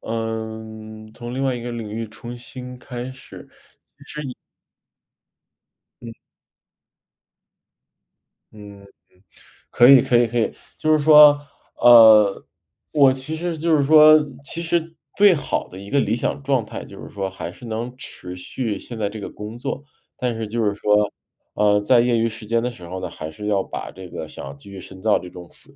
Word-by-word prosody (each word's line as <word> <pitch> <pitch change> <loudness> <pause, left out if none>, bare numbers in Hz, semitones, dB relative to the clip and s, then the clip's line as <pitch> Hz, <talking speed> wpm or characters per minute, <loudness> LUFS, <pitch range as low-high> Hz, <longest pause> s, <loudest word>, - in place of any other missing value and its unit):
呃， 110 -1 -6
从 120 0 -7
另 135 - -2
外 130 -2 0
一 120 - -5
个 120 +1 -6
领 115 -2 -6
域 115 +1 -4
重 120 +2 -9
新 125 0 -10
开 125 0 -7
始， 130 - -13 0.7
其 150 - -5
实 140 - -6
也 125 - -7 1.7
嗯。 115 -1 -8 2.4
嗯 100 -2 -13
嗯， - - -16 0.9
可 120 +1 +6
以 135 -2 +9
可 120 - +2
以 120 - +3
可 120 +1 -2
以。 110 - 0 0.2
就 155 - 0
是 155 - +3
说， 150 -1 +7 0.4
呃， 110 -4 +7 0.5
我 140 -3 +5
其 135 +4 -4
实 170 0 -3
就 165 +1 +2
是 145 - +2
说 155 +1 +7 0.2
其 165 +4 -5
实 165 -1 -2 0.2
最 205 -2 +6
好 145 -4 -3
的 95 - -11
一 100 - -10
个 140 - +2
理 115 - 0
想 130 +3 -3
状 135 -5 0
态， - - -8
就 - - -12
是 - - -10
说 95 -1 -4
还 85 -2 -7
是 120 +7 -14
能 115 +2 -5
持 90 -7 -9
续 110 +4 -4
现 120 - -10
在 100 -1 -1
这 110 +1 -8
个 - - -6
工 105 +3 -9
作。 130 +3 -5 0.3
但 125 -2 -2
是 110 -1 -4
就 115 +2 -2
是 105 -1 +1
说， 105 0 +2 0.4
呃， 105 0 +3
在 120 +3 +4
业 120 -1 +1
余 115 +1 +1
时 110 0 -10
间 115 +1 0
的 125 - -1
时 90 -7 -12
候 95 +1 -6
呢， - - -4
还 80 0 -8
是 105 +6 -7
要 100 -2 +1
把 - - -7
这 95 -1 -11
个 - - -7
想 70 +1 -9
继 100 - -15
续 95 -1 -9
深 95 0 -12
造 105 +1 +2
这 - - -10
种 90 -1 -12
副 - - -19
115 Hz, 205 characters per minute, -21 LUFS, 105-130 Hz, 2.4 s, 以